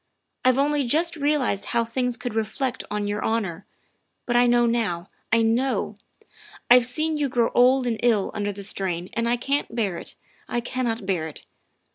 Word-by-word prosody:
" - - -53
I've 255 0 +5
only 290 +1 +2
just 320 +8 +1
realized 285 -9 0
how 235 -1 0
things 250 +1 -1
could 245 -3 -5
reflect 225 +4 -2
on 210 0 -2
your 205 +1 -2
honor 200 -5 -2 0.6
but 240 - -1
I 245 0 +5
know 240 0 +4
now, 220 -8 -1 0.2
I 230 +1 +4
know. 245 +4 0 0.7
I've 245 0 +7
seen 310 +4 0
you 290 -2 0
grow 240 -2 +1
old 255 +1 +4
and 230 -3 -1
ill 225 -5 +2
under 205 -1 -2
the 200 0 -8
strain 185 -3 -3
and 230 0 0
I 240 - +2
can't 275 0 -2
bear 200 -7 -1
it - - -9 0.3
I 240 - -1
can't 235 -3 -2
bear 180 -5 -1
it. 155 - -10
235 Hz, 185 wpm, -24 LUFS, 210-255 Hz, 0.7 s, I've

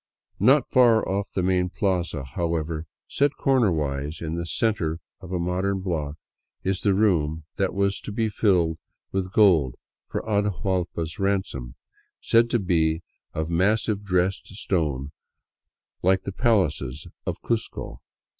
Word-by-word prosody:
Not 130 +6 +5
far 120 -3 +5
off 100 +1 -2
the 95 - -1
main 90 0 +2
plaza, 90 -4 -1
however, 80 +3 -2 0.2
set 145 +1 +1
cornerwise 80 - +1
in 80 -1 -4
the 85 0 -3
center 90 -7 0 0.2
of 95 -2 -10
a 90 - 0
modern 95 +3 -1
block, 80 -6 -2 0.5
is 95 0 0
the 100 -2 +3
room 80 -7 +2
that 95 -1 0
was 100 0 +1
to - - -6
be 110 +2 0
filled 90 -7 +2 0.3
with 95 -1 -2
gold 85 - +4 0.3
for - - -3
Atahuallpa's 95 -6 -1
ransom, 95 -11 -1 0.4
said 115 +1 +3
to 120 - +2
be 80 -5 +1 0.3
of 80 +1 -2
massive 105 +4 +1
dressed 90 -1 0
stone, 75 -9 -1 0.9
like 95 +1 +3
the 100 - -4
palaces 80 - +1 0.2
of - - -2
Cuzco. 110 - -3
95 Hz, 135 wpm, -25 LUFS, 80-100 Hz, 0.9 s, Not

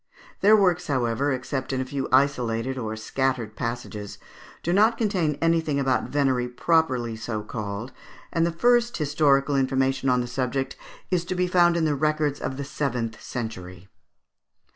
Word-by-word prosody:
Their 215 +2 +6
works, 180 -3 +2
however, 130 0 0
except 130 +1 -3
in 130 - -1
a 130 - -1
few 135 0 -4
isolated 130 -2 +2
or 110 -4 -4
scattered 120 0 -2
passages, 115 -4 -5 0.5
do 175 - 0
not 220 +4 +4
contain 180 -10 0
anything 165 -3 +2
about 135 -2 0
venery 135 -4 +1
properly 125 -3 +1
so 110 -1 -4
called, 105 +2 -5 0.4
and 165 -2 +2
the 170 - +1
first 240 +6 +2
historical 145 -2 +2
information 135 0 +1
on 125 0 +3
the 120 - -1
subject 130 +2 -2 0.4
is 180 -2 +1
to 185 - -3
be 180 0 +1
found 175 -1 +4
in 165 - +1
the 150 - +2
records 150 0 0
of 130 - -3
the 140 - -3
seventh 120 -6 -3
century. 95 -6 -6
135 Hz, 160 wpm, -25 LUFS, 120-160 Hz, 0.5 s, Their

